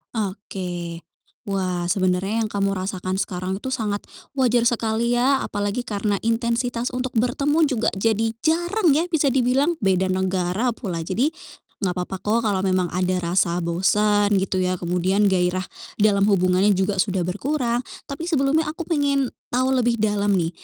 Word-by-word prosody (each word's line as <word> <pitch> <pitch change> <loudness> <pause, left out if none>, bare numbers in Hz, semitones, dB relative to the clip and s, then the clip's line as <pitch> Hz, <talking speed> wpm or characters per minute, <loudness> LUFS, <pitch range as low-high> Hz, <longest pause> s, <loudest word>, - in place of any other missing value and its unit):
Oke, 180 -5 -4 0.4
wah, 185 -3 -1
sebenarnya 185 +4 +1
yang 215 - -1
kamu 200 -1 0
rasakan 185 0 -2
sekarang 185 +2 -3
itu 260 - -4
sangat 215 -5 -2 0.3
wajar 245 -3 +2
sekali 235 0 +1
ya, 260 +3 +3
apalagi 205 +4 -2
karena 205 -1 -1
intensitas 235 +1 0
untuk 250 0 -4
bertemu 275 +7 +1
juga 235 -4 +1
jadi 225 +2 0
jarang 345 +4 +2
ya, 310 +5 +3
bisa 315 -5 +1
dibilang, 270 +6 +2
beda 190 -2 +1
negara 190 +5 0
pula. 175 -8 -5
Jadi, 235 - +1 0.5
enggak 185 -4 0
papa 180 +1 -4
kok 225 +3 +2
kalau 195 -3 0
memang 185 -2 +1
ada 180 +1 0
rasa 175 0 +1
bosan, 205 +4 +2
gitu 190 -1 -1
ya, 185 -1 0
kemudian 185 +4 +2
gairah 180 0 +1 0.4
dalam 200 -2 +4
hubungannya 190 0 +3
juga 190 +1 0
sudah 190 -1 +1
berkurang, 240 - -1 0.2
tapi 290 +4 -5
sebelumnya 310 -1 +2
aku 320 +3 -6
pengen 280 -4 +1 0.2
tahu 260 +1 +2
lebih 240 -1 +2
dalam 205 -1 +1
nih. 170 -3 +1
205 Hz, 150 wpm, -23 LUFS, 185-245 Hz, 0.5 s, dalam